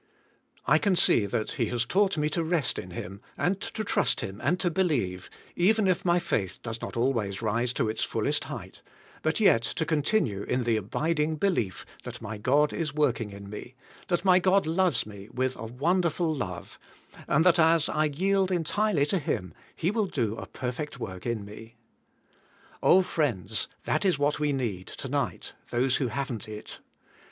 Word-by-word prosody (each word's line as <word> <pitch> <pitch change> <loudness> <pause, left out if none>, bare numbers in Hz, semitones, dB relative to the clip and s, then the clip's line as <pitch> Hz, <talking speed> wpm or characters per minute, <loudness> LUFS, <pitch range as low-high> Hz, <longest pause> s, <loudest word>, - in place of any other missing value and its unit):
I - - +5
can 200 -3 +2
see 110 -10 +5
that 110 0 -2
He 115 - -1
has 120 +2 -1
taught 195 - +2
me 150 0 +1
to 170 - 0
rest 160 -2 +1
in 90 - -7
Him 95 +3 -7 0.2
and 190 +2 0
to 220 - -4
trust - - +1
Him 95 +1 -6
and 175 +7 +2
to 175 -3 +1
believe, 125 - 0 0.3
even 210 +4 +3
if 185 -2 +2
my 175 -1 +3
faith 95 - -1
does 115 -1 -5
not - - -5
always 115 -5 0
rise 115 +3 0
to 115 - 0
its 110 +1 -1
fullest - - 0
height, - - -8 0.4
but 155 +5 0
yet 190 - +5
to 160 +7 -2
continue 150 - +1
in 125 +4 -1
the 115 -1 +2
abiding 150 - 0
belief 150 - -1 0.2
that - - -7
my 110 -1 -6
God 145 +7 +3
is 150 -4 -3
working 130 -7 +1
in 100 0 -10
me; 105 +5 -8 0.3
that 175 +1 0
my 185 -1 +6
God 190 +1 +3
loves 165 -5 +2
me, 100 -1 -11
with 130 0 -1
a 115 - -6
wonderful 170 +6 +1
love, 95 - -6 0.5
and 155 +4 +3
that 175 -2 +5
as 160 -1 +5
I 155 0 +1
yield 190 +6 +1
entirely 180 -1 +1
to 185 +5 0
Him 90 - -3 0.2
He 170 +4 0
will 215 -2 0
do 115 - -1
a - - -7
perfect 130 +2 -5
work 95 -2 -6
in 115 -4 -2
me. 110 +3 -11 1.1
Oh 190 +1 +6
friends, 140 - -1 0.2
that - - 0
is 185 -6 +3
what 145 +1 +1
we 150 -1 +1
need, 115 -9 -2
to - - -7
night, - - -2 0.2
those 130 +2 +1
who 130 - 0
haven't 120 -3 -4
it. 105 0 -8
140 Hz, 185 wpm, -28 LUFS, 110-175 Hz, 1.1 s, my